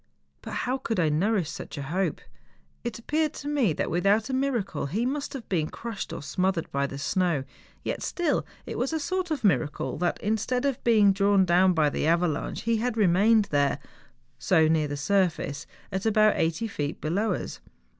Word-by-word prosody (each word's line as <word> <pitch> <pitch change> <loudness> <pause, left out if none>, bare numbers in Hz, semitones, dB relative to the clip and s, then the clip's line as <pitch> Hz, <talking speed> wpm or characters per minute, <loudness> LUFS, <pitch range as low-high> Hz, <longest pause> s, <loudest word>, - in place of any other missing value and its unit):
But - - -7
how 255 +2 -1
could 225 -6 -2
I 160 -3 +3
nourish 175 +1 +1
such 155 - -8
a 140 - -4
hope? 180 +7 -1 0.6
It 235 -2 -4
appeared 305 +6 0
to 290 - -7
me 280 - +2
that - - -2
without 200 +8 +2
a - - -3
miracle 235 - -1
he 210 - -1
must 280 +2 -2
have 265 -4 -7
been 160 -5 0
crushed 230 -4 -6
or - - -5
smotliered 180 +3 -1
by 140 0 0
the 135 - -7
snow; 170 -1 0 0.4
yet - - -3
still 345 -4 0 0.2
it - - -5
was 265 +5 -1
a 320 - 0
sort 370 +3 -2
of 305 -6 -2
miracle 160 -7 0
that 175 0 0
instead 220 +5 -1
of 275 -3 -1
being 210 -4 +5
drawn 200 -1 +3
down 180 +1 +4
by 155 -3 +2
the 150 - -1
avalanche, 170 -2 0
he 230 0 +1
had 235 +1 -1
remained 210 +3 +4
there, 145 -1 +2 0.6
so 160 -1 +4
near 155 -1 +2
the 145 0 -4
surface, 160 -4 0 0.2
at 190 +3 -1
about 215 -1 +5
eiglity 165 +8 0
feet 150 -8 -4
below 200 +8 0
us. - - -5
195 Hz, 190 wpm, -27 LUFS, 160-235 Hz, 0.6 s, being